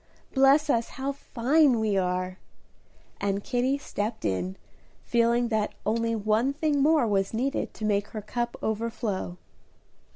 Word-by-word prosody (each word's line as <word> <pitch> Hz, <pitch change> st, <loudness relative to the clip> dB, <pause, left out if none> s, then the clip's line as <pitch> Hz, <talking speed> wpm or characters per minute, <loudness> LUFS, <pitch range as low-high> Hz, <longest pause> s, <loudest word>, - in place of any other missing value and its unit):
Bless 275 Hz, +3 st, +5 dB
us, 235 Hz, -5 st, +1 dB
how 270 Hz, +1 st, -1 dB
fine 275 Hz, 0 st, +2 dB
we 215 Hz, -2 st, +1 dB
are!" 185 Hz, 0 st, -1 dB, 0.8 s
and 200 Hz, 0 st, -1 dB
Kitty 255 Hz, +2 st, +1 dB
stepped 220 Hz, -5 st, -4 dB
in, 95 Hz, 0 st, -1 dB, 0.5 s
feeling 235 Hz, 0 st, +2 dB
that 215 Hz, -2 st, -1 dB
only 230 Hz, +2 st, +1 dB
one 220 Hz, +5 st, +1 dB
thing 295 Hz, -1 st, +1 dB
more 300 Hz, -2 st, +4 dB
was 200 Hz, -1 st, 0 dB
needed 265 Hz, +4 st, -1 dB
to 215 Hz, -, -4 dB
make 205 Hz, -1 st, +1 dB
her 215 Hz, -, -6 dB
cup 240 Hz, +3 st, -3 dB
overflow. 220 Hz, -4 st, -2 dB
230 Hz, 135 wpm, -27 LUFS, 205-265 Hz, 0.8 s, Bless